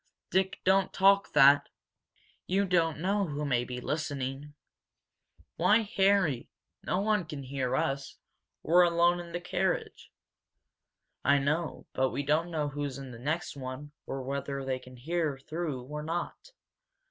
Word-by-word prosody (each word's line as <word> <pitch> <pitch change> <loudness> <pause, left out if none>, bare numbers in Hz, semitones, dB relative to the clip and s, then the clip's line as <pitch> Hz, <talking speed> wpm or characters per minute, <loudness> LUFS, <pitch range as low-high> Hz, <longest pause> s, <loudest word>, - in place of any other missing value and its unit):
"Dick, 190 0 +1
don't 190 0 +3
talk 195 +1 +4
that! 140 0 +6 0.8
You 195 +2 +2
don't 170 -4 +2
know 195 +4 0
who 150 0 -3
may 125 -4 +1
be 125 0 -5
listening!" 145 0 -4 1.0
"Why, 220 +2 +4
Harry! 190 -10 +3 0.3
No 185 - -1
one 210 -2 +2
can 150 -4 -7
hear 130 -1 -2
us 135 +1 -2 0.5
we're 175 +3 +5
alone 175 0 +4
in 170 -1 -8
the 175 - -3
carriage!" 180 +1 -2 1.1
"I 140 +1 +5
know, 150 +4 -1
but 130 0 +1
we 140 - -3
don't 155 +5 +1
know 155 -3 -1
who's 145 -2 -4
in 135 -2 -8
the 115 - -10
next 155 +7 -2
one 135 +2 -7 0.2
or 135 -1 -4
whether 140 0 -3
they 130 -1 -1
can 130 0 -14
hear 155 +1 -1
through 150 -2 -4
or 150 +4 -6
not. 170 - -4
150 Hz, 145 wpm, -30 LUFS, 135-175 Hz, 1.1 s, that